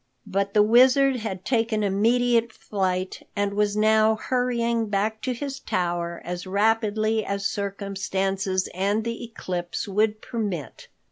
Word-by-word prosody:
But 200 +1 -2
the 210 - +7
Wizard 255 +4 +5
had 190 -5 -5
taken 225 -3 +1
immediate 230 +3 +2
flight, 185 -3 -2
and 205 -1 0
was 205 0 +1
now 220 +1 +4
hurrying 235 -1 0
back 215 +2 -1
to 255 - -1
his 270 +2 -4
tower 170 -5 -2
as 180 +2 -5
rapidly 215 +2 +1
as 200 0 -3
circumstances 195 -1 -1
and 200 +4 0
the 230 +1 -4
eclipse 180 -7 -4
would 210 +2 +1
permit. 210 - -5
210 Hz, 130 wpm, -25 LUFS, 195-230 Hz, -, the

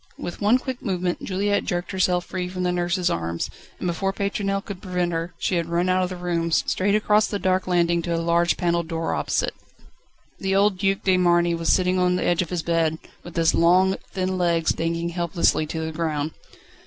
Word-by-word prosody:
With 175 - -6
one 210 +5 +5
quick 260 -1 -5
movement 180 -4 -2
Juliette 205 +2 0
jerked 175 0 -3
herself 180 -2 +1
free 180 -1 -4
from 185 0 -4
the 180 - +1
nurse's 175 +1 0
arms, 85 0 -3 0.3
and - - -6
before 180 +3 0
Pétronelle 195 0 -2
could 195 -3 -7
prevent 180 -2 -1
her, 165 +1 -3
she 180 - 0
had 170 -1 -1
run 175 +2 +1
out 185 0 +3
of 180 - -1
the 185 - -5
room, 175 -2 -1
straight 190 +4 +1
across 210 0 +3
the 205 - -2
dark 185 -1 0
landing 170 -1 +2
to 170 0 -2
a - - 0
large 170 +1 +2
panelled 170 -2 0
door 165 -1 -2
opposite. - - -1 0.9
The 195 0 0
old 200 -1 +3
Duc 195 0 +1
de 190 -1 +3
Marny 175 -1 +3
was 165 0 0
sitting 185 0 +2
on 180 0 +2
the 180 - -1
edge 175 0 +2
of 175 - -4
his 175 -3 -2
bed, 165 -2 +1 0.3
with 175 - -11
his 165 -1 +3
long, 185 +3 +4 0.2
thin 185 -1 -2
legs 170 -2 +2
dangling 165 +1 -2
helplessly 170 -2 +1
to 160 +1 -4
the 160 - -3
ground. 155 -2 -2
180 Hz, 210 wpm, -23 LUFS, 170-185 Hz, 0.9 s, one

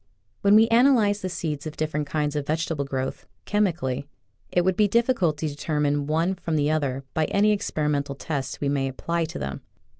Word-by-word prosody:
When 200 +1 +5
we 220 +1 +7
analyze 230 -4 +4
the 185 - -3
seeds 155 -4 -4
of 155 - -8
different 150 -1 -2
kinds 150 -1 -1
of 145 -1 -2
vegetable 160 -2 -1
growth, 130 -1 -4 0.2
chemically, 165 -10 0 0.4
it 175 -1 +2
would 185 -1 +2
be 210 +1 +4
difficult 225 - +2
to 155 - -2
determine 145 -1 -1
one 165 +4 +1
from 170 -3 -3
the 150 0 +2
other 140 -4 -1
by 160 - +1
any 205 +5 +3
experimental 150 -8 -1
test 140 -1 -4
we 145 - 0
may 140 -1 0
apply 170 +5 -2
to 160 - -7
them. 70 0 -5
155 Hz, 185 wpm, -25 LUFS, 145-185 Hz, 0.4 s, we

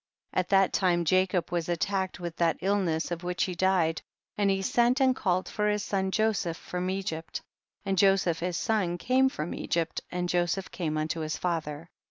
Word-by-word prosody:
2. - - +2
At 180 - -1
that 195 -1 +4
time 175 -3 +2
Jacob 185 0 +2
was 175 -1 -1
attack 190 +2 -1
ed - - -12
with 170 -2 -5
that 165 -3 +2
illness 185 -5 0
of 170 - -2
w^hich 180 0 -3
he 185 - -3
died, 175 -3 +2 0.3
and 205 -1 +2
he 195 0 +2
sent 240 +6 +3
and 260 -1 +4
called 185 -4 0
for 210 0 0
his 210 -1 0
son 190 -2 -1
Joseph 195 -5 0
from 180 +1 -4
Egypt, 185 -4 -3 0.5
and 195 -2 0
Joseph 195 -4 +3
his 175 0 -2
son 200 -6 0
came 260 +7 +3
from 155 - -4
Egypt, 165 -2 -2
and 180 0 -2
Joseph 175 +2 0
came 155 -4 -2
unto 155 +2 -2
his 155 0 -2
father. 165 -2 -3
180 Hz, 195 wpm, -28 LUFS, 170-195 Hz, 0.5 s, that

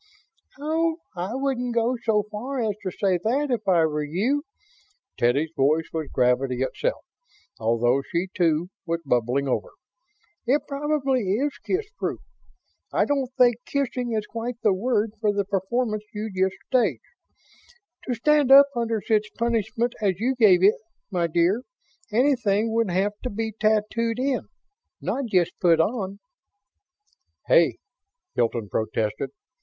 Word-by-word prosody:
"Oh, 320 +2 0 0.2
I 185 +7 -3
wouldn't 255 -3 -1
go 235 +2 +2
so 210 -2 +2
far 255 +6 -4
as 220 -3 0
to 190 - -3
say 185 0 0
that, 275 +5 0
if 220 -4 -2
I 170 -4 +4
were 150 -1 -1
you." 225 - 0 0.7
Teddy's 140 +7 +1
voice 155 +4 +2
was 160 -2 -3
gravity 125 0 +1
itself, - - -2 0.5
although 115 +4 +2
she, 175 +2 0
too, 170 0 +1 0.2
was 165 0 -2
bubbling 125 +2 +1
over. 130 - -1 0.8
"It 280 +4 +3
probably 280 -2 0
is 280 +7 0
kissproof. 420 +4 -2 0.7
I - - +2
don't 275 -3 -1
think 245 -2 +5
'kissing' 250 -4 -1
is 215 -1 -1
quite 230 +2 -5
the 210 - +4
word 220 +1 0
for 210 -2 +3
the 200 -1 -1
performance 215 +3 -1
you 215 +1 -4
just 190 0 +1
staged. 220 - +1 1.1
To 250 - 0
stand 290 +3 +3
up 280 +1 +9
under 230 -3 -1
such 215 -1 +2
punishment 235 +1 0
as 195 -3 +1
you 250 +4 +1
gave 205 -8 +5
it, 205 +3 +4 0.3
my 175 -3 +1
dear, 175 +7 +2 0.5
anything 225 -3 +2
would 230 -3 +1
have 195 +3 +1
to 250 - -3
be 220 +1 -3
tattooed 220 +2 +1
in, 265 +1 -1 0.5
not 275 - -2
just 180 -5 +1
put 170 -3 +4
on." 195 +1 0 1.3
"Hey!" - - +4 0.6
Hilton 115 -2 0
protested. 110 +4 -2
215 Hz, 140 wpm, -24 LUFS, 175-250 Hz, 1.3 s, up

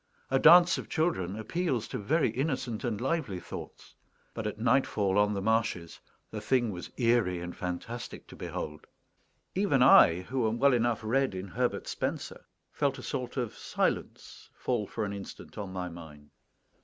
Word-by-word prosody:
A 135 - +3
dance 175 +3 +7
of - - -8
children 110 - 0
appeals 125 0 -1
to - - -4
very 135 +4 +1
innocent 130 -3 -2
and 115 -5 -2
lively 130 - -1
thoughts; - - -9 0.4
but, 110 -2 -3
at 105 - -4
nightfall 110 -5 +2
on 105 0 +2
the 100 - -3
marshes, 110 -7 0 0.3
the - - -5
thing 120 -4 +1
was 90 -2 -7
eerie 115 -7 +2
and 90 0 -6
fantastic 100 +7 -5
to - - -11
behold. 75 0 -6 0.7
Even 165 -10 +3
I, 85 -7 +7
who 120 +4 -1
am 115 - -2
well 140 +2 +4
enough 120 -2 +1
read 130 0 +1
in 95 +1 -5
Herbert 125 +5 -1
Spencer, - - -4 0.3
felt 140 -2 0
a 130 - -9
sort 130 -2 -4
of 120 -4 -2
silence - - -3
fall 120 -5 -1
for 110 - -3
an 100 - -4
instant 100 -1 -9
on 100 -2 -5
my 90 -1 -4
mind. 75 -4 -11
115 Hz, 170 wpm, -30 LUFS, 95-130 Hz, 0.7 s, dance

